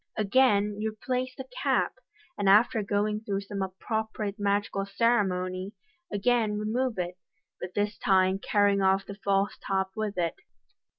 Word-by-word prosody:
Again 210 Hz, -2 st, +3 dB
you 220 Hz, -, 0 dB
replace 255 Hz, +3 st, -3 dB
the 265 Hz, -, -7 dB, 0.2 s
cap -, -, +2 dB
j -, -, -30 dB, 0.4 s
and 200 Hz, -, +2 dB
after 215 Hz, +2 st, +5 dB
going 210 Hz, +1 st, 0 dB
through 200 Hz, -2 st, -3 dB
some 200 Hz, 0 st, -5 dB
appropriate 210 Hz, +2 st, -3 dB
magical 200 Hz, -1 st, 0 dB
ceremony, 195 Hz, -3 st, 0 dB, 0.4 s
again 215 Hz, 0 st, +1 dB
remove 225 Hz, +2 st, -1 dB
it, 180 Hz, 0 st, -3 dB, 0.4 s
but 180 Hz, 0 st, -7 dB
this 205 Hz, 0 st, -1 dB
time 190 Hz, -1 st, +3 dB
carrying 200 Hz, -1 st, +2 dB
off 190 Hz, 0 st, +3 dB
the 200 Hz, -, -7 dB
false 195 Hz, 0 st, +1 dB
top 190 Hz, -1 st, -1 dB
with 215 Hz, -3 st, -3 dB
it. 170 Hz, -2 st, 0 dB
205 Hz, 145 wpm, -28 LUFS, 195-220 Hz, 0.4 s, after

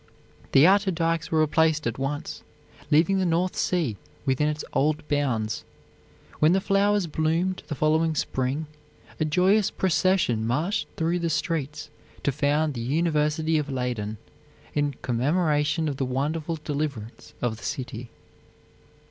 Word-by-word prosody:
The 135 Hz, -, +7 dB
outer 195 Hz, +2 st, +5 dB
dikes 165 Hz, -2 st, 0 dB
were 160 Hz, -1 st, +2 dB
replaced 155 Hz, 0 st, +2 dB
at 115 Hz, +2 st, -2 dB
once, 145 Hz, +2 st, -3 dB, 0.5 s
leaving 165 Hz, +6 st, +4 dB
the -, -, +1 dB
North 175 Hz, +2 st, +1 dB
Sea 160 Hz, -, 0 dB, 0.3 s
within 140 Hz, +2 st, +2 dB
its 150 Hz, 0 st, -4 dB
old 150 Hz, +1 st, +1 dB
bounds. 115 Hz, -7 st, -1 dB, 0.8 s
When 155 Hz, +3 st, +5 dB
the 190 Hz, -, +3 dB
flowers 200 Hz, 0 st, +2 dB
bloomed 165 Hz, +4 st, 0 dB
the 150 Hz, -, -3 dB
following 155 Hz, +2 st, +2 dB
spring, 135 Hz, +2 st, -1 dB, 0.5 s
a 155 Hz, -, +2 dB
joyous 185 Hz, +7 st, +3 dB
procession 185 Hz, -, +1 dB
marched 155 Hz, -, 0 dB
through 165 Hz, +2 st, 0 dB
the 170 Hz, -1 st, -1 dB
streets 150 Hz, -1 st, -2 dB, 0.3 s
to 140 Hz, -, +2 dB
found 145 Hz, +3 st, +1 dB
the 120 Hz, -, -5 dB
University 155 Hz, +3 st, +1 dB
of 150 Hz, -1 st, -3 dB
Leyden, 120 Hz, -5 st, -3 dB, 0.6 s
in 145 Hz, -2 st, 0 dB
commemoration 150 Hz, +4 st, +1 dB
of 140 Hz, -3 st, -3 dB
the 135 Hz, -, 0 dB
wonderful 150 Hz, +6 st, -2 dB
deliverance 140 Hz, -7 st, -4 dB
of 120 Hz, -3 st, -1 dB
the -, -, -14 dB
city. 125 Hz, -5 st, -5 dB
150 Hz, 140 wpm, -25 LUFS, 135-165 Hz, 0.8 s, The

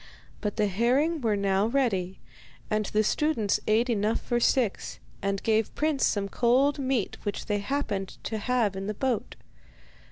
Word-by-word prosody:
But 210 Hz, -2 st, -3 dB
the 210 Hz, -, +2 dB
herring 255 Hz, -, +1 dB
were 220 Hz, -3 st, +1 dB
now 200 Hz, +1 st, +1 dB
ready, 215 Hz, -8 st, 0 dB, 0.5 s
and 215 Hz, -1 st, +1 dB
the 215 Hz, 0 st, +1 dB
students 225 Hz, -4 st, +1 dB
ate 220 Hz, +3 st, +3 dB
enough 220 Hz, -2 st, +1 dB
for 240 Hz, -1 st, -1 dB
six, 240 Hz, -3 st, +1 dB, 0.2 s
and 195 Hz, 0 st, -2 dB
gave 220 Hz, -1 st, +1 dB
Prince 300 Hz, -3 st, +1 dB
some 200 Hz, -1 st, -1 dB
cold 255 Hz, +7 st, +2 dB
meat 260 Hz, -5 st, -1 dB
which 205 Hz, -, -4 dB
they 210 Hz, -1 st, 0 dB
happened 205 Hz, -5 st, -3 dB
to 220 Hz, -, -3 dB
have 225 Hz, -3 st, +1 dB
in 195 Hz, +1 st, -4 dB
the 210 Hz, -, -3 dB
boat. 250 Hz, -1 st, -2 dB
220 Hz, 160 wpm, -27 LUFS, 200-255 Hz, 0.5 s, ate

